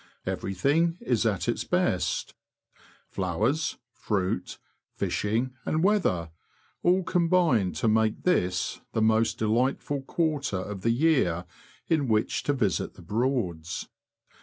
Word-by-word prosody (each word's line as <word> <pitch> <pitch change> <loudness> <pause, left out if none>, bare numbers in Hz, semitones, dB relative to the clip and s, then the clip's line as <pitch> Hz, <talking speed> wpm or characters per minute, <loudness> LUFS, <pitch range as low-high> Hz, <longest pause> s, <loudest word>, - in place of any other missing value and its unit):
Everything 145 - +1
is 120 -2 +1
at 100 -4 -1
its - - 0
)|^^; - - -22
best. - - 0 0.7
Flowers, 110 - -1 0.2
fruit, 95 -3 -2 0.4
fishing, 115 +5 -1
and 160 +2 0
weather, 95 - +2 0.5
all 185 +2 +3
combine 170 - +2
to - - -1
make 110 0 +2
this 90 - 0
the 110 - +1
most 110 +1 +3
delightful 125 +5 0
quarter 145 - -1
of 95 +1 -5
the 115 - +1
year 115 - +2 0.4
in 155 -5 +1
which 110 -2 +1
to 145 - 0
visit 105 - -1
the - - -13
Broads. 105 -8 -2
115 Hz, 120 wpm, -27 LUFS, 100-155 Hz, 0.7 s, all